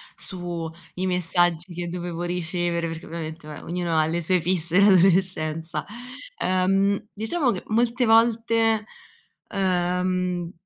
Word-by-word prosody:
su 175 -3 -4 0.3
i 185 - -2
messaggi 175 -1 +1
che 175 0 -5
dovevo 175 -1 -5
ricevere, 175 -1 -1
perché 165 0 -7
ovviamente 160 -1 -7
vabbè 150 - -8
ognuno 170 -1 -2
ha 155 0 +3
le 170 +1 -1
sue 180 +2 +2
fisse 175 0 +1
in 200 +1 +7
adolescenza 175 -4 +2 0.6
ehm, 195 +3 +1
diciamo 245 +6 0
che 185 - -4
molte 240 +2 +1
volte, 225 -1 +3 0.7
uhm, 180 -2 0
180 Hz, 125 wpm, -24 LUFS, 170-195 Hz, 0.7 s, in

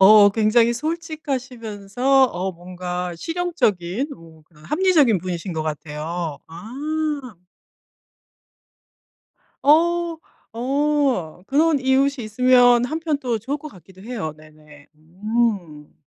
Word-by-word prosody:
어 205 +1 +8
굉장히 225 +2 +3
솔직하시면서 260 - -1
어 190 -4 -2
뭔가 180 0 -5
실용적인 270 - -1
뭔가 160 -1 -18
합리적인 300 - +3
분이신 180 0 -5
것 160 -1 -2
같아요. 155 +1 -4
아. 175 +8 -10 2.9
어. 335 +3 +3 0.4
어 265 - 0
그런 310 +1 +3
이웃이 265 -1 +1
있으면 245 +1 +5
한편 315 +2 -1
또 240 -4 -2
좋을 275 +7 -3
것 305 +1 -9
같기도 190 0 -17
해요. 205 -9 -5
네네. 155 -1 -18
음. 180 -2 -2
220 Hz, 205 characters per minute, -22 LUFS, 175-275 Hz, 2.9 s, 어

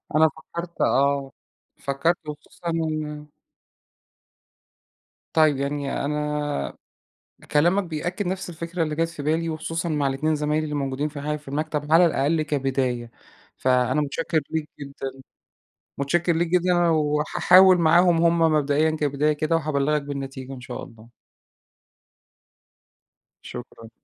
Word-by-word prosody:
أنا 160 +1 +6
فكّرت 170 +3 -8
آه. 140 0 +2 0.5
فكّرت 140 +5 0
وخصوصًا 160 +3 -7
إن 155 -2 -3 2.1
طيب، 155 -3 +4
يعني 140 0 -2
أنا 150 - -2 0.8
كلامك 175 +7 +3
بيأكّد 175 +4 -3
نفس 185 0 -3
الفكرة 170 +1 -3
اللي 155 -1 -2
جات 165 +1 0
في 150 -4 -8
بالي، 165 +2 0
وخصوصًا 165 +2 -3
مع 150 -3 +1
ال2 155 +4 0
زمايلي 150 +1 0
اللي 150 -1 -3
موجودين 140 +1 -2
في 145 -1 -8
ح 150 +1 -1
في 145 -2 -12
المكتب 150 +1 -3
على 175 +2 +7
الأقل 155 +1 +1
كبداية. 130 -5 -1 0.5
فأنا 130 +2 +2
مُتشكّر 160 +2 -1
ليك 160 -1 -2
جدًا 140 -1 -6 0.9
مُتشكّر 170 +4 +1
ليك 170 +1 +1
جدًا، 180 +1 +2
وهاحاول 160 +4 +5
معاهم 170 +1 +4
هم 170 0 +3
مبدئيًا 155 -1 +3
كبداية 150 -1 +1
كده، 155 +2 0
وهابلّغك 150 -1 +1
بالنتيجة 135 -2 -6
إن 125 - -9
شاء - - -7
الله. 115 0 -14 2.3
شكرًا. 120 -2 -10
150 Hz, 120 wpm, -24 LUFS, 140-165 Hz, 2.3 s, على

